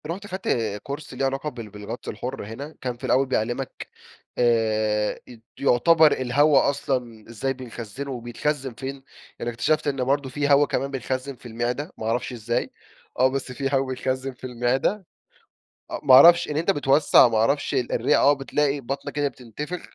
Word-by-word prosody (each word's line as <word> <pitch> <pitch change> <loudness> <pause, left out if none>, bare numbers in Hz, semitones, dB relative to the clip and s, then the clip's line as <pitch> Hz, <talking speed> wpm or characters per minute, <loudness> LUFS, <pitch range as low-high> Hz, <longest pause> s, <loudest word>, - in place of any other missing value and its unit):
رُحت 190 +5 -5
خدت 190 0 -6 0.4
كورس 145 +1 -7
ليه 135 +2 -1
علاقة 135 +3 -2
بال 115 -6 -9
بالغطس 105 +3 -7
الحر 130 -2 -5
هنا، 140 +9 -8
كان 125 -2 -3
في - - -20
الأول 135 +2 +3
بيعلمك 130 +1 -3 0.5
آآ، 110 -3 +1
أت 120 -3 -13 0.2
يعتبر 155 +4 +5
الهوا 140 +3 +3
أصلًا 125 -6 -3
إزاي 120 +4 -2
بنخزنه 130 +1 -7
وبيتخزن 130 +2 -3
فين، 135 +2 -7 0.4
يعني 120 - -3
اكتشفت 150 +7 0
إن 135 -2 0
برضو 135 +1 0
في 145 +2 -1
هوا 145 +1 +6
كمان 140 0 -2
بنخزن 130 +1 -3
في 125 - -22
المعدة، 120 +8 -3
ما 110 - -6
أعرفش 120 +3 -1
إزاي، 120 0 -2 0.5
آه، 130 - +6
بس 130 -1 -3
في 135 +2 -2
هوا 135 0 +2
بيتخزن 130 +1 -2
في 125 - -27
المعدة، 130 - 0 0.9
أ - - -3
ما 135 -3 +5
أعرفش، 170 +6 +8
إن 150 - -2
أنت 170 +5 +2
بتوسع 145 -4 +5
ما 115 -2 0
أعرفش 140 +7 +1
الرئة 120 0 +1
آه، 145 - +5
بتلاقي 140 +1 0
بطنك 135 +2 -5
كده 145 -1 0
بتنتفخ، 145 +7 -7
130 Hz, 170 wpm, -24 LUFS, 120-145 Hz, 0.9 s, أعرفش